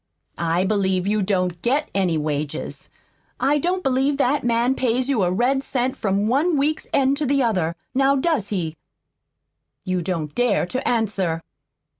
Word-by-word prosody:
I 170 +1 +1
believe 190 -2 +1
you 210 +1 +1
don't 185 -3 -1
GET 280 +7 0
any 185 -4 +1
wages. 150 -1 -3 0.5
I 280 +3 +2
don't 365 +4 -1
believe 270 +2 +1
that 280 +1 +1
man 240 +1 +2
pays 255 0 0
you 255 -7 +2
a 180 - +2
red 250 +8 +1
cent 255 -1 -1
from 200 -1 0
one 290 +8 +2
week's 300 +3 0
end 275 0 +2
to 300 - -1
the 275 0 +2
other. 180 -8 0 0.2
Now 275 +1 +3
does 275 - 0
he? 170 -6 -3 1.1
You 185 -1 -1
don't 165 -4 -3
dare 245 -7 +2
to 255 +9 -3
answer!" 195 -8 0
230 Hz, 160 wpm, -22 LUFS, 185-270 Hz, 1.1 s, Now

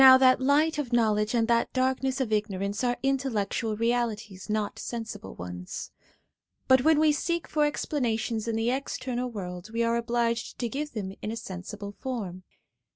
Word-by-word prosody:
Now, 260 0 +11
that 260 0 +5
light 295 +3 +3
of 265 -5 -3
knowledge, 215 -1 +2
and 225 -1 +3
that 235 -1 +2
darkness 260 +1 +1
of 240 -5 0
ignorance, 205 0 -1
are 245 -1 +1
intel 270 -1 +1
lectual 210 +1 -1
realities, 225 -4 -1
not 210 -1 -1
sensible 225 -3 -5
ones; 90 0 -6 0.8
but 260 -1 +6
when 315 0 +5
we 310 0 +5
seek 340 +3 -1
for 300 -1 +2
explanations 235 -6 -1
in 230 - 0
the 225 +2 +1
external 255 -2 -2
world, 180 -3 -6
we 230 +1 0
are 230 0 +2
obliged 235 -1 0
to 240 - -1
give 295 +4 -4
them 195 -4 -4
a 220 +2 -3
sensible 200 -1 -6
form. 205 -9 -4
235 Hz, 165 wpm, -28 LUFS, 210-260 Hz, 0.8 s, Now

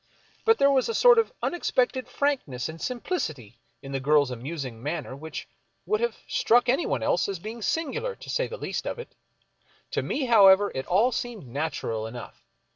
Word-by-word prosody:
But 450 0 +5
there 280 0 +5
was 265 - +2
a 455 - -1
sort 485 -2 +7
of 455 - +1
unexpected 260 -6 0
frankness 255 - -1
and 160 +1 -9
simplicity 155 - -4 0.2
in 135 - -8
the 135 - -1
girl's 145 -1 +3
amusing 130 -2 -6
manner 145 -1 -4
which 160 +3 -7 0.4
would 430 +1 0
have 475 - -1
struck 245 +2 +3
anyone 265 +7 +1
else - - +1
as 195 - -3
being 220 +6 -8
singular, 335 - -2
to - - -13
say - - 0
the 485 - -7
least - - -4
of - - -3
it. 475 - -9 0.8
To - - 0
me, 280 - -2
however, 205 -4 +6
it 130 - -4
all 210 +8 +3
seemed 235 - -4
natural 120 -5 -3
enough. 120 +1 -10
205 Hz, 180 wpm, -26 LUFS, -, 0.8 s, sort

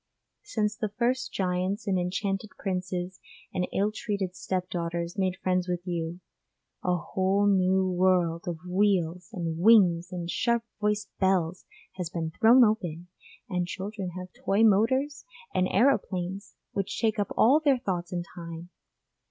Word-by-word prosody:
Since 215 - -1
the 215 - -2
first 245 +5 -1
giants 185 +3 -1
and 190 -3 +1
enchanted 195 +3 -2
princes 185 -1 -3 0.3
and 180 -1 0
ill 205 +2 +1
treated 200 -4 -3
step 185 -1 -2
daughters 170 0 -3
made 190 -2 0
friends 185 -1 0
with 175 0 -3
you, 170 0 -3 0.6
a 180 -1 +2
whole 190 +4 +1
new 190 -1 +3
world 180 -2 +2
of 170 -2 -2
wheels 180 -2 +1
and 165 -3 -3
wings 180 -4 +5
and 175 -2 -4
sharp 235 +7 +1 0.2
voiced 210 0 -1
bells 185 -2 +1 0.3
has 180 -3 -3
been 165 -1 -3
thrown 235 +8 +6
open, 180 -6 0 0.4
and 180 -2 -1
children 195 +1 -5
have 185 0 -8
toy 200 +3 +1
motors 230 +8 +3 0.3
and 185 - +2
aeroplanes 195 -5 0 0.2
which 195 -1 -3
take 220 -1 +1
up 205 - -1
all 270 +7 +6
their 285 -4 +3
thoughts 180 -7 -3
and 175 -1 -3
time. 170 0 -8
185 Hz, 145 wpm, -28 LUFS, 175-210 Hz, 0.6 s, thrown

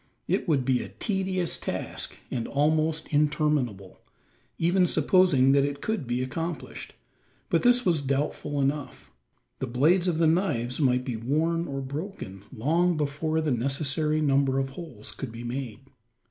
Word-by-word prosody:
It - - 0
would 140 -6 +2
be 130 -1 +2
a - - -7
tedious 190 -4 -1
task - - -4
and 120 -2 -2
almost 155 +2 +1
interminable, 145 - 0 0.6
even 180 +2 +3
supposing 155 -5 +4
that 140 0 +4
it 145 0 -2
could 215 - -2
be 120 +1 0
accomplished; 165 +6 -5 0.6
but - - +3
this 245 0 +4
was 165 -5 +2
doubtful 140 +1 -2
enough. 140 - -2 0.5
The 130 - -2
blades 160 +10 +3
of 170 -3 +1
the 165 - +3
knives 155 -8 +1
might 125 -3 +2
be 125 -4 -3
worn 160 +8 0
or 135 -1 -4
broken, 140 - -6
long 165 +8 +1
before 155 +2 -1
the 155 -2 0
necessary 140 +5 +1
number 135 -2 +2
of 135 0 -1
holes 135 -8 -9
could 130 - -7
be 115 +1 -8
made. 120 -2 -5
145 Hz, 150 wpm, -27 LUFS, 130-165 Hz, 0.6 s, supposing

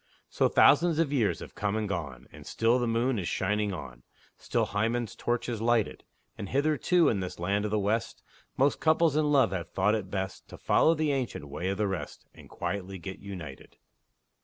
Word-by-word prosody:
So - - +2
thousands 165 +2 +5
of 160 -3 +1
years 115 -7 +1
have - - -9
come 105 0 -2
and 110 -1 -1
gone, 75 -10 -5
And - - -13
still 115 +2 +2
the 120 - 0
moon 115 +1 +1
is 90 - -3
shining 105 0 0
on, 70 -9 -8 0.3
Still - - -1
Hymen's 115 +2 -1
torch 120 0 -2
is 115 -3 -3
lighted; 115 -2 +1 0.4
And 100 - -5
hitherto, 155 +5 +2
in 105 - +1
this 90 -1 -5
land 100 +4 0
of - - -1
the 105 - 0
West, 110 +3 -1 0.3
Most 140 +2 +2
couples 160 -1 +3
in 150 -1 +2
love 135 -9 +4
have 90 -3 -4
thought 100 +3 +1
it 105 -4 -2
best 95 -1 -4
To - - -11
follow 165 - +3
the 155 -1 0
ancient 125 - -3
way 80 +6 -4
of 100 - -2
the 105 - +1
rest, 95 -2 -5
And - - -15
quietly 95 -1 -4
get 95 +2 -8
united. 90 -9 -9
105 Hz, 200 wpm, -28 LUFS, 95-130 Hz, 0.4 s, thousands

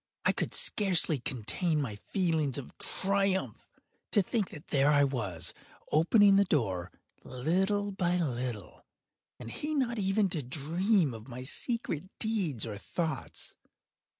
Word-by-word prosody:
I - - +5
could - - -2
scarcely 180 -7 +4
contain 145 - -1
my 125 -8 -3
feelings 160 - -1
of 140 - -8
triumph. 195 0 -1 0.4
To 205 - +3
think 205 -1 -1
that 150 - -12
there 140 0 +3
I 145 -1 +5
was, 115 -12 -1 0.4
opening 195 +5 +5
the 200 - +6
door, 95 - -1 0.3
little 190 +10 0
by 180 -2 0
little, 125 - -4 0.6
and 115 - -8
he 305 +1 -3
not 240 -5 0
even 195 +1 +2
to 165 -4 -2
dream 160 - +1
of 110 +1 -10
my 125 0 -7
secret 180 - -2
deeds 190 - +1
or 105 -3 -6
thoughts. 160 - -4
160 Hz, 135 wpm, -30 LUFS, 130-195 Hz, 0.6 s, the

